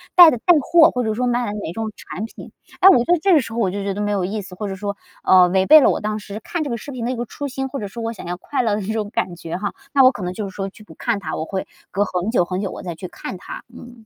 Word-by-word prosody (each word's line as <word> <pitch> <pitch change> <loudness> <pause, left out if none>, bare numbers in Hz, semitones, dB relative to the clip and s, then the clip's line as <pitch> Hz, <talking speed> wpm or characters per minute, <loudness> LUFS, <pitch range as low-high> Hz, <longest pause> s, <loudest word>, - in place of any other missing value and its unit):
带 350 -3 +10
的 245 - -1
带 350 +9 +5
货， 325 +3 +6
或 250 - -1
者 220 -1 0
说 250 +3 -1
卖 245 0 +1
的 205 - -3
哪 160 - -4
种 220 +4 -4
产 210 - -6
品。 225 - -11 0.3
哎， 380 - +9
我 385 - +7
觉 240 - +2
得 350 +1 +3
这 385 +2 +4
个 310 - +6
时 230 -2 -8
候 235 - -2
我 200 -5 +2
就 200 +2 -4
觉 200 0 -2
得 205 - -4
没 205 0 0
有 195 -3 0
意 210 +3 -3
思， 185 -1 -11
或 210 +3 -4
者 195 - -4
说， 200 +1 -4 0.3
嗯， 180 -1 +6
违 190 0 +3
背 310 +5 +9
了 - - +5
我 - - 0
当 215 0 -2
时 205 0 -8
看 340 -3 -3
这 290 - -4
个 235 - -2
视 285 - -9
频 245 -3 -4
的 245 - -1
一 - - -2
个 240 0 -3
初 285 +5 -6
心， 270 0 -3
或 270 +1 -5
者 205 - -4
说 230 +4 -8
我 225 - -2
想 220 - -10
要 175 +1 -4
快 275 +9 -2
乐 215 -3 +1
的 210 - -3
那 205 +3 -3
种 215 -2 -2
感 180 - -2
觉 165 0 -5
哈。 205 +2 -3 0.2
那 275 -2 +6
我 255 - +7
可 205 - -7
能 180 0 -3
就 205 +1 -4
是 190 - -15
说 195 -1 -3
去 210 - -16
不 - - -15
看 235 -4 -1
它， 160 -5 -4
我 155 - -3
会 190 +2 -4 0.2
隔 200 +3 +1
很 185 +2 -2
久 205 -7 +3
很 185 +2 -3
久 195 -3 -3
我 - - -8
再 175 -2 -5
去 180 +3 -7
看 180 +1 -7
它。 - - -9
嗯。 240 -2 -13
210 Hz, 370 characters per minute, -21 LUFS, 190-245 Hz, 0.3 s, 带